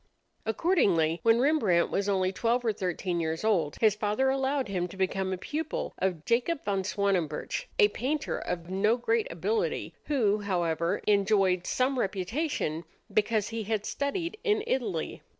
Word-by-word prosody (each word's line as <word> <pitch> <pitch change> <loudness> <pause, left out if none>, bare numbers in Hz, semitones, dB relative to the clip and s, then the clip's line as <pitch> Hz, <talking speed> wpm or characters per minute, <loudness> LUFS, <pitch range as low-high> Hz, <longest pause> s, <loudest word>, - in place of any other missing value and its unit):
Accordingly, 195 - +2
when 230 0 +4
Rembrandt 240 - +3
was 200 +1 0
only 190 -2 +1
twelve 235 +4 0
or 220 - +2
thirteen 180 -2 -2
years 160 +1 -2
old, 175 -9 +1
his 220 -2 +5
father 210 +6 +1
allowed 270 -1 0
him 180 -3 -1
to 190 - -12
become 190 0 0
a 185 - -1
pupil 320 - -4
of 180 -5 -1
Jacob 250 +7 0
van 195 -2 0
Swanenburch, 195 - -1
a 425 -4 +7
painter 295 - -2
of 170 -1 -4
no 205 +5 +2
great 455 - 0
ability, 445 -2 -1
who, 220 -8 +2
however, 170 -4 -1
enjoyed 195 -3 +3
some 255 +1 +1
reputation 195 - -2 0.3
because 215 -1 +1
he 225 0 -3
had 215 -1 -1
studied 335 +7 -2
in 425 -2 +2
Italy. 215 - -2
210 Hz, 150 wpm, -28 LUFS, 185-265 Hz, 0.3 s, a